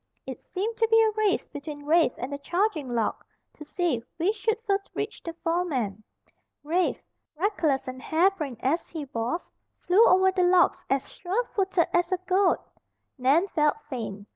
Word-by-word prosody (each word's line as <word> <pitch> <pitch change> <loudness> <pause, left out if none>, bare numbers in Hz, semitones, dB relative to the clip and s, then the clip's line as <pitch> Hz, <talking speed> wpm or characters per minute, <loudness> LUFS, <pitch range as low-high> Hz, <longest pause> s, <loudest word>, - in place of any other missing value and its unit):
It - - -7
seemed 435 +4 -4
to 450 -1 +3
be 450 0 +5
a 445 -1 +4
race 425 -2 0
between 290 -1 -8
Rafe 320 -3 +3
and 260 +4 -5
the 285 - -4
charging 345 - -1
log, 225 -2 -1 0.3
to - - -10
see 300 -6 -1
which 360 +6 +1
should 440 +1 0
first 395 -1 0
reach 420 - -4
the 335 - -6
foreman. 275 - -1 0.6
Rafe, 340 +4 0 0.3
reckless 320 -8 0
and 255 0 -6
harebrained 320 - +1
as 305 +6 0
he 315 -4 -5
was, 235 +10 -3 0.3
flew 380 +6 +4
over 380 -1 +5
the 375 -1 0
logs 360 0 +4
as 270 0 0
sure 390 +7 -2
footed 380 -4 +2
as 350 0 +2
a 370 - +2
goat. 375 0 +3 0.6
Nan 285 +9 +3
felt 300 -4 +2 0.2
faint. 210 -5 -5
345 Hz, 165 wpm, -26 LUFS, 285-390 Hz, 0.6 s, be